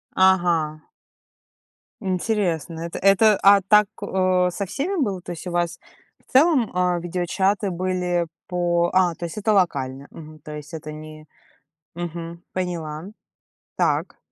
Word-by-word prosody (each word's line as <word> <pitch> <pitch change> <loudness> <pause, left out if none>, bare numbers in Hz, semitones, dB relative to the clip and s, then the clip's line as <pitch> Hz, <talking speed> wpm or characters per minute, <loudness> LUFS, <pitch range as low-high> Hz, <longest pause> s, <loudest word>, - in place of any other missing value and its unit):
Ага. 175 -5 +3 1.2
Интересно. 180 -5 -1
Это 170 0 -5
это 200 +2 +5
а 200 0 +7
так, 210 +2 +5
э, 185 -1 +2
со 200 +3 -3
всеми 310 - -2
было? 195 -8 -1
То 175 - -8
есть 170 +1 -7
у - - -4
вас 175 -1 -1 0.5
в - - -24
целом, 270 -4 +4
э, 180 -1 +1
видеочаты 190 +3 0
были 180 -1 -1 0.2
по 175 -1 +1
а, 180 -2 +3
то 170 - -5
есть 170 - -7
это 215 +1 +1
локально, 140 -8 0
мгм, 155 -1 -12
то 150 +1 -10
есть 150 +2 -10
это 155 -1 -6
не 155 0 -10 0.7
Мгм. 170 0 -6
Поняла. 165 -4 -4 0.7
Так. - - 0
175 Hz, 140 wpm, -23 LUFS, 165-190 Hz, 1.2 s, а